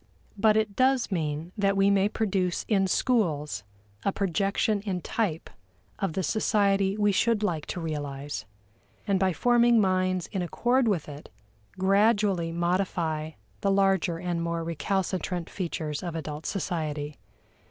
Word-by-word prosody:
But 215 +1 +4
it 215 -2 0
does 260 -2 +2
mean 160 -1 -2
that 200 -2 +1
we 195 +1 +4
may 200 0 +3
produce 190 -5 -1
in 195 -3 +2
schools 160 - 0 0.4
a 195 - +1
projection 200 +2 0
in 190 -3 -3
type 180 -7 -2 0.5
of 195 -5 -1
the 190 - -1
society 200 +1 +2
we 205 -1 +3
should 220 +2 +2
like 165 -7 -1
to - - -4
realize, 145 -3 -4 0.6
and 195 -2 +1
by 190 0 +2
forming 240 +4 +4
minds 185 -2 +1
in 190 - -2
accord 240 +8 +1
with 185 -8 0
it 145 0 -10 0.5
gradually 195 -2 +2
modify 170 -3 -1 0.3
the 200 - 0
larger 195 -3 +2
and 175 -1 -2
more 170 0 -2
recalcitrant 180 +1 -2
features 160 -5 -3
of 175 -2 -5
adult 155 -1 -5
society. 155 -6 -3
190 Hz, 140 wpm, -27 LUFS, 165-205 Hz, 0.6 s, But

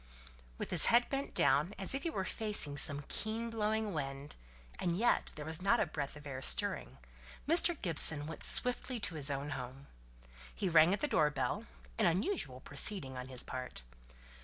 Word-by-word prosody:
With - - -5
his 175 - +4
head 240 +1 +4
bent 275 0 -3
down 150 +9 +3
as 195 +4 -1
if 275 - -2
he 335 - -2
were 190 -11 -3
facing 210 -11 -1
some 145 0 +2
keen 225 +2 -2
blowing 220 -1 -1
wind 140 -1 -5 0.4
and 175 -1 0
yet 240 +4 +2
there 150 - -7
was 160 +2 -1
not 200 +5 +3
a - - +2
breath 150 -4 -5
of 150 0 -12
air 130 -2 -6
stirring - - 0 0.5
Mr. 335 0 +3
Gibson 160 -4 +3
went 160 0 -8
swiftly 250 0 +1
to 180 - -1
his 150 -2 +4
own 140 +1 -3
home. 130 +1 -7 0.7
He 190 - -1
rang 165 +1 +6
at 200 - 0
the 295 - +1
door 155 - +3
bell; 135 -4 -3 0.3
an - - +4
unusual 170 - -1
proceeding 145 -2 -3
on 125 0 -6
his 130 -2 +2
part. 125 - -6
160 Hz, 185 wpm, -34 LUFS, 140-215 Hz, 0.7 s, rang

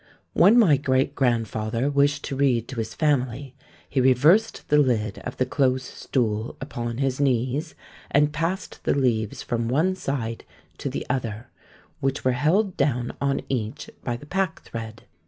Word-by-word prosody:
"When 200 +8 +6
my 175 - +6
great 135 0 +1
grandfather 115 -2 0
wished 145 +1 +2
to 135 - -4
read 130 -4 +2
to 130 - -7
his 110 -1 -3
family, 135 -3 0 0.3
he 135 - 0
reversed 150 - +4
the 150 - +5
lid 110 -7 +1
of 125 - -7
the 130 - +2
close 130 -1 +1
stool 110 -5 -2
upon 120 -1 -4
his 135 -1 -1
knees, 135 +3 0 0.3
and 150 +1 +3
passed 165 +5 -3
the - - +1
leaves 115 -6 0
from 115 -1 -2
one 160 +9 +2
side 135 -10 -3 0.4
to - - -3
the - - -4
other, 120 -3 -3 0.5
which 135 0 -2
were 130 - +4
held 175 - +1
down 125 -4 0
on 140 -1 +1
each 115 -5 -3
by 120 -1 -2
the 145 - -13
packthread. 130 -11 -4
130 Hz, 155 wpm, -24 LUFS, 120-145 Hz, 0.5 s, When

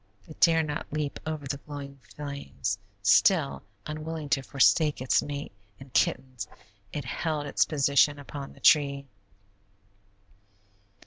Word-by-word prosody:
It 155 - -13
dare 165 -1 +5
not 150 0 -5
leap 150 -1 -3
over 155 -2 -3
the 140 +1 -3
glowing 140 -1 -8 0.2
flames; 140 -8 -4 0.2
still, 155 - +4 0.2
unwilling 155 0 -5
to 140 -1 +2
forsake 145 +3 +3
its 130 0 +2
mate 145 0 -5 0.3
and 135 -1 -13
kittens, 130 -5 0 0.4
it 145 -3 -4
held 150 +3 -2
its 140 - +2
position 145 -1 +3
upon 140 -1 -8
the - - -18
tree. 140 -2 +4
145 Hz, 125 wpm, -28 LUFS, 140-150 Hz, 0.4 s, dare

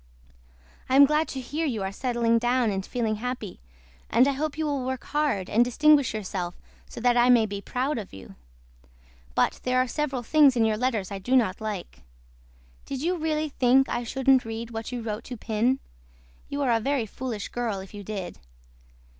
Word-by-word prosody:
I 260 - +2
AM 280 +1 +9
GLAD 300 +2 +1
TO 270 - -5
HEAR 295 +6 -3
YOU 225 -7 -2
ARE 190 - -3
SETTLING 235 0 +1
DOWN 240 -1 +1
AND 190 -1 -2
FEELING 225 -3 -1
HAPPY 245 -4 -5 0.5
AND 245 +5 +4
I - - +3
HOPE 295 +2 -3
YOU 315 - -1
WILL 285 -3 -1
WORK 260 0 -3
HARD 290 -11 -1
AND 235 +3 +4
DISTINGUISH 285 +1 +3
YOURSELF 185 -4 -4 0.3
SO - - -8
THAT 245 +1 +3
I 240 +1 +5
MAY 235 -3 +6
BE 200 -1 -5
PROUD 255 +5 -2
OF 205 - -8
YOU. 95 0 -11 1.0
BUT - - +1
THERE 255 0 0
ARE 255 0 +3
SEVERAL 270 -2 -2
THINGS 285 +1 +5
IN 230 -2 +3
YOUR 215 -1 +1
LETTERS 225 -6 -1
I 200 - -4
DO 245 +7 0
NOT 220 -6 +2
LIKE. 210 - -5 0.9
DID 275 0 -4
YOU 355 +2 +1
REALLY 310 -1 -1
THINK 265 0 +3
I 240 - -2
SHOULDN'T 265 +2 +3
READ 225 +1 -6
WHAT 225 +1 -5
YOU 245 -2 -4
WROTE 215 0 -4
TO 250 - -7
PIN. 230 +4 0 0.7
YOU 285 0 -2
ARE 255 - +2
A 230 - +3
VERY 270 0 0
FOOLISH 225 -1 -5
GIRL 230 -5 -2
IF 190 - -12
YOU 205 -1 -8
DID. 195 -3 -6
245 Hz, 195 wpm, -26 LUFS, 215-270 Hz, 1.0 s, AM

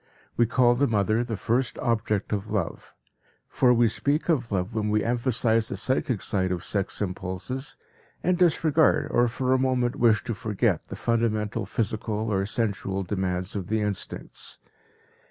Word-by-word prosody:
We 120 - +3
call 120 +1 +4
the 140 +4 +2
mother 110 +1 +1
the 115 -3 -4
first 120 +5 0
object 110 -3 -1
of 105 +1 -3
love. 105 -5 -3 0.5
For 125 - +3
we 120 -1 +4
speak 140 +9 -1
of 125 -9 +1
love 95 +2 -1
when 105 -1 -1
we 105 0 +2
emphasize 115 -2 +1
the 100 - -4
psychic 125 0 0
side 95 -3 0
of 90 -1 -2
sex 100 0 -2
impulses, 95 +8 -4 0.5
and 180 +1 +3
disregard 160 -4 +3
or 120 0 +3
for 130 +2 0
a 130 - +3
moment 125 -2 +1
wish 110 -3 +4
to 120 - -3
forget 105 -1 -1
the - - -7
fundamental 115 -2 0
physical 110 0 -2
or 95 0 0
"sensual" 100 -4 -2
demands 95 0 -2
of 95 -4 -3
the 110 0 0
instincts. 105 -2 -5
110 Hz, 160 wpm, -26 LUFS, 100-125 Hz, 0.5 s, call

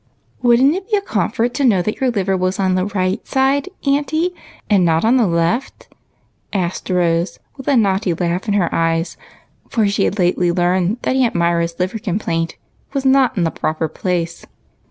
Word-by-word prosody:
" - - -38
Would 240 -1 +4
n't 280 +3 +5
it 380 +4 -5
be 425 - +3
a - - -1
comfort 230 - -1
to 280 - -1
know 205 -9 +3
that 215 +7 -4
your 260 - +3
liver 195 -4 0
was 185 +1 -1
on 190 -1 +2
the 185 +1 0
right 185 -2 -1
side, 275 +5 +1 0.2
auntie, 305 +5 +1 0.3
and 200 -5 +3
not 165 +2 +2
on 240 +4 +4
the 235 -5 +3
left?" 170 +10 -1 0.6
asked 185 -2 -3
Rose 175 -1 +1 0.2
with 265 - -11
a 280 - +4
naughty 195 -3 +2
laugh 175 +4 -2
in 205 - +1
her 180 -5 +1
eyes, 165 +1 0 0.5
for 220 -3 +1
she 200 - +1
had 205 - -1
lately 180 -1 +2
learned 180 +4 +1
that 260 - 0
Aunt 255 -3 +1
Myra's 170 0 +1
liver 185 +5 -1
complaint 170 -5 -2 0.4
was 275 -1 -2
not 265 -3 +3
in 180 - +2
the 165 - 0
proper 160 +1 -2
place. 170 +1 -3
190 Hz, 195 wpm, -18 LUFS, 175-245 Hz, 0.6 s, n't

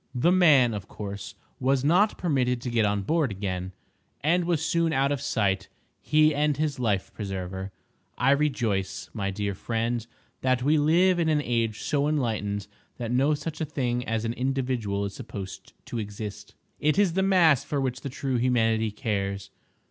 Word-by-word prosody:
The 145 +8 +3
man, 150 -10 +5
of 100 -2 -5
course, 100 -2 -7 0.2
was 130 0 +2
not 180 +8 +3
permitted 125 -7 +1
to 125 - -4
get 115 -2 +3
on 100 -1 0
board 155 - +1
again, 95 -2 -4 0.5
and 170 +5 +2
was 165 -3 0
soon 165 0 +1
out 140 -1 +2
of 140 -3 -1
sight, 95 -4 0 0.3
he 155 0 +4
and 150 -1 +1
his 150 -3 -1
life 105 -6 -1
preserver. 95 -1 -5 0.5
I 125 +2 +3
rejoice, 115 -10 0
my 100 -3 -2
dear 100 +1 -2
friend, 115 +3 -2 0.3
that 130 -1 +1
we 150 +3 +3
live 175 +5 +4
in 165 -2 +2
an 150 -1 +2
age 115 -4 -1
so 145 -1 +1
enlightened 110 -8 -1 0.3
that 120 -1 -4
no 135 +5 +3
such 155 +2 -6
a - - +2
thing 125 -5 -1
as 115 0 -1
an 115 - -1
individual 125 -6 -1
is 100 - -5
supposed 95 -1 -8
to 120 - -4
exist. 105 0 -7 0.2
It 150 +3 +2
is 200 -4 +3
the 190 - +1
mass 180 -8 +4
for 145 - -2
which 130 -1 -2
the 140 - -4
true 135 0 -2
Humanity 115 -3 +2
cares. 100 -3 -3
125 Hz, 175 wpm, -26 LUFS, 105-150 Hz, 0.5 s, man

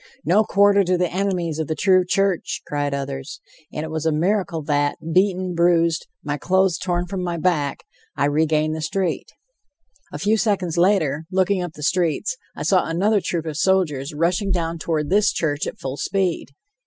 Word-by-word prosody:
"No 205 +5 +4
quarter 200 -1 +4
to 180 0 +1
the 180 -1 -1
enemies 180 -5 -1
of 160 - -2
the 155 - -2
true 185 -1 +4
church," 195 0 0
cried 145 -1 -2
others, 135 0 -5 0.3
and 150 - -4
it 160 - -6
was 160 -1 -3
a - - +3
miracle 170 0 0
that, 145 -1 0 0.2
beaten, 185 -1 +2
bruised, 170 -1 +2 0.2
my 145 -1 -3
clothes 185 -1 +2
torn 175 -1 -1
from 185 +1 -4
my 175 -1 -2
back, 155 -5 0 0.3
I 140 - +2
regained 155 +1 +1
the 160 - -5
street. 180 +2 -2 0.8
A - - -5
few 215 +2 +1
seconds 195 -7 0
later, 165 -5 +2
looking 190 0 +1
up 175 -3 -5
the 150 - -9
streets, 175 - 0 0.2
I - - -5
saw 185 -3 +2
another 195 +6 +1
troop 170 -3 -3
of 155 -2 -4
soldiers, 165 -6 +1
rushing 175 +5 0
down 170 -3 -1
toward 155 -1 -2
this 205 +1 +4
church 145 -2 -1
at - - -6
full 135 +1 -5
speed. 190 -2 -1
170 Hz, 180 wpm, -22 LUFS, 155-190 Hz, 0.8 s, No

